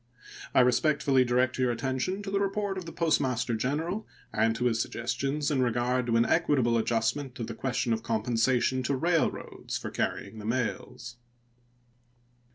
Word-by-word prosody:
I - - +7
respectfully 135 +1 +3
direct 125 +1 +1
your 130 -1 +2
attention 130 - -2
to 195 - -5
the 200 - +1
report 200 0 -1
of 185 -2 -5
the - - -6
Postmaster 130 -7 +1
General 155 - -2 0.3
and 115 +1 +2
to 125 +1 -2
his 115 -2 +2
suggestions 135 +7 -2
in 135 -3 +2
regard 125 +1 +1
to 115 - +1
an 115 0 +4
equitable 135 -8 +2
adjustment 120 +4 -1
of 115 - -2
the 115 - -6
question 120 0 -1
of 110 - -2
compensation 120 +3 +1
to 135 +2 0
railroads 165 +4 -1
for - - -6
carrying 110 - -3
the 105 - -8
mails. 120 0 -3
125 Hz, 160 wpm, -28 LUFS, 115-145 Hz, 0.3 s, I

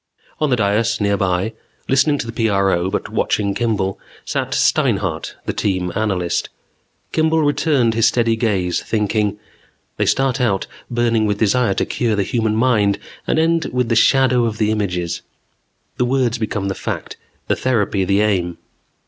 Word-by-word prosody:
On 155 -2 +1
the 125 - +3
dais 105 0 +1
nearby, 100 0 0 0.3
listening 145 +2 +3
to 115 - -4
the 115 - -6
PRO, 95 -3 +1
but - - -3
watching 100 -2 0
Kimball, 105 -4 -1 0.3
sat - - -2
Steinhart, - - +1
the - - -2
team 90 -3 -1
analyst. 90 -5 -1 0.6
Kimball 160 0 +2
returned 145 -5 +2
his 115 0 +3
steady 115 -2 +2
gaze 100 -6 0
thinking: 105 -1 0 0.6
They - - 0
start 135 -1 +1
out 100 -6 +1 0.2
burning 115 -2 +1
with 105 -1 0
desire 110 0 +2
to - - 0
cure 115 -4 -1
the 100 - +1
human 110 +1 0
mind 110 -4 +2 0.3
and - - +1
end 165 0 +2
with 125 -2 0
the 115 - +2
shadow 125 0 +4
of 110 -2 -2
the 110 -1 +1
images. 90 -5 -2 0.8
The 125 - +1
words 125 -2 0
become 105 -3 -2
the 95 - -1
fact, - - -5 0.3
the - - +2
therapy 105 -6 0
the 100 +2 +2
aim. 90 -5 0
110 Hz, 155 wpm, -19 LUFS, 100-125 Hz, 0.8 s, shadow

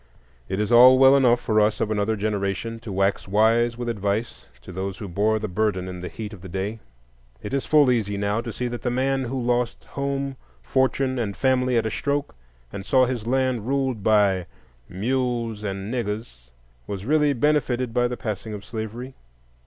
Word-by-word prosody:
It 95 +1 -2
is 105 +1 -1
all 125 +2 +8
well 135 +1 +7
enough 125 -3 +4
for 110 -2 +1
us 105 0 +1
of 110 - -1
another 105 +1 0
generation 105 +2 -2
to 110 -2 -8
wax 95 +1 0
wise 115 +4 +3
with 120 0 -4
advice 105 - -2 0.2
to - - -10
those 95 +1 -4
who 105 - -7
bore 105 +4 +1
the 110 0 -3
burden 95 -1 -1
in 90 -1 -7
the 90 - -5
heat 110 -1 -7
of 100 - -11
the 95 - -9
day. 100 +5 -3 0.6
It 105 - -6
is 140 - -1
full 145 -4 +5
easy 105 -4 0
now 100 +2 0
to 115 - -6
see 125 +2 -3
that 120 0 -5
the 125 - -1
man 135 +2 0
who 130 +2 -3
lost 120 -1 -1
home, 140 -1 -3 0.3
fortune, 130 - +1
and 100 -6 -3
family 125 +1 +2
at 115 - +1
a 110 - -1
stroke, 145 +4 -2 0.4
and 100 - -5
saw 130 +5 +4
his 120 -3 -4
land 130 -3 0
ruled 135 -4 0
by 100 -4 +3 0.4
"mules 115 +1 -2
and 100 +2 -4
niggers," 105 - -5 0.4
was 100 -1 -5
really 150 +1 +3
benefited 130 -3 0
by 120 0 +2
the 120 0 -5
passing 105 0 -5
of 100 - -9
slavery. 115 +3 -6
115 Hz, 190 wpm, -24 LUFS, 100-130 Hz, 0.6 s, all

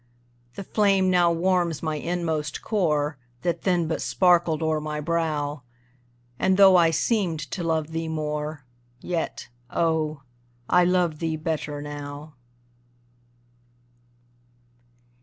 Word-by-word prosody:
The 200 - -6
flame 195 -2 +2
now 175 -1 +4
warms 170 -2 0
my 155 -1 -1
inmost 160 -2 -2
core, 150 - 0 0.2
That 170 -1 -1
then 175 -4 +2
but 160 - -2
sparkled 175 -3 +2
o'er 155 -1 0
my 150 0 -4
brow, 150 -3 -1 0.8
And, 190 0 +2
though 195 -2 +8
I 170 -2 +6
seemed 175 -2 0
to 180 - -3
love 160 -1 -1
thee 165 0 -3
more, 150 -2 -4 0.3
Yet, 170 +3 -4 0.2
oh, 155 -3 0 0.4
I 180 0 +4
love 175 -4 +1
thee 160 -1 -1
better 155 -2 -3
now. 145 +1 -8
160 Hz, 115 wpm, -25 LUFS, 150-175 Hz, 0.8 s, though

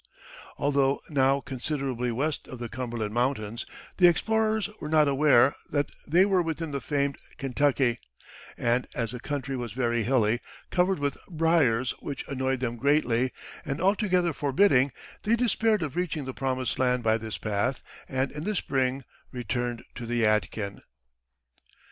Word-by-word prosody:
Although 140 -1 +2
now 135 -1 +3
considerably 130 -2 -2
west 140 +6 -2
of 130 - -8
the 120 -1 -5
Cumberland 115 -3 -4
Mountains, 120 -2 -1 0.3
the 180 - +7
explorers 220 +4 +2
were 150 - -5
not 155 -1 +4
aware 140 -2 +5 0.2
that 145 -1 0 0.2
they 175 +5 +5
were 190 -3 +3
within 165 -1 -3
the 140 -1 -3
famed 140 -1 -1 0.2
Kentucky; 135 -2 +1 0.6
and 120 +2 +1
as 115 -2 -1
the 125 - -6
country 140 0 -3
was 120 -4 -4
very 120 -2 0
hilly, 120 -1 +2 0.3
covered 185 +1 +2
with 145 -1 -2
briers 155 -8 +2
which 140 - -6
annoyed 130 -1 -1
them 120 -2 -2
greatly, 130 -2 +2 0.3
and 145 -1 -3
altogether 185 -3 +2
forbidding, 140 -2 +3 0.3
they 225 +2 +2
despaired 225 -4 +2
of 150 -1 -4
reaching 165 -5 -2
the 130 - -5
promised 130 -2 -2
land 125 -1 +2
by 110 0 +3
this 110 -1 -5
path, 105 +5 -1 0.3
and 130 0 0
in 150 +1 -6
the 210 +3 -1
spring 135 -4 0 0.3
returned 120 0 -3
to 120 -1 -7
the 120 0 0
Yadkin. 105 -1 0
135 Hz, 150 wpm, -27 LUFS, 120-155 Hz, 0.6 s, the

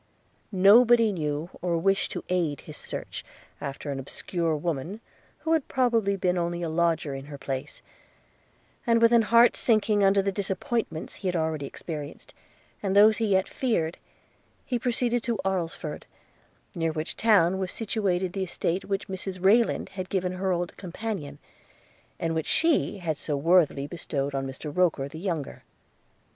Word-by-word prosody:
Nobody 225 +4 +6
knew, 155 -1 -3
or 175 -2 0
wished 195 +3 +1
to - - -5
aid 170 -6 0
his - - -10
search - - -6 0.4
after 140 +1 -5
an 135 - -3
obscure 165 +4 -2
woman, 165 +5 -3 0.4
who 325 - +1
had 320 -4 +1
probably 230 -6 +2
been 180 -1 0
only 175 0 -2
a 165 - -2
lodger 165 -3 +1
in 135 0 -6
her 145 0 -8
place; 135 +1 -5 1.0
and 230 0 +4
with 230 0 +5
an 235 -1 +6
heart 235 +2 +5
sinking 215 -3 +3
under 195 0 +4
the 195 - 0
disappointments 195 - -2
he 195 - -4
had 180 - 0
already 160 -3 -1
experienced, 150 -2 -8 0.5
and 195 -1 -1
those 215 +2 +7
he 225 - 0
yet 190 -2 +2
feared, 175 -11 -1 0.7
he 245 -2 -1
proceeded 245 0 0
to 230 -1 -1
Alresford, 170 -5 -3 0.7
near 165 -1 -1
which 155 +1 -4
town 190 -5 +4
was 185 -1 -2
situated 190 -5 -1
the 195 - -3
estate 180 0 -2
which 195 -1 -2
Mrs 190 0 -5
Rayland 215 +5 +3
had 185 -1 -6
given 185 -2 0
her 185 +1 -1
old 175 -1 -2
companion, 180 -6 -5 0.8
and 165 -1 -1
which 160 -1 -2
she 325 -9 +2
had 165 -5 -2
so 145 -2 -2
worthily 155 -2 +3
bestowed 145 -3 -3
on 135 0 -2
Mr 145 +3 -7
Roker 165 -7 +2
the 155 +3 -9
younger. 165 -6 -4
180 Hz, 160 wpm, -27 LUFS, 160-205 Hz, 1.0 s, those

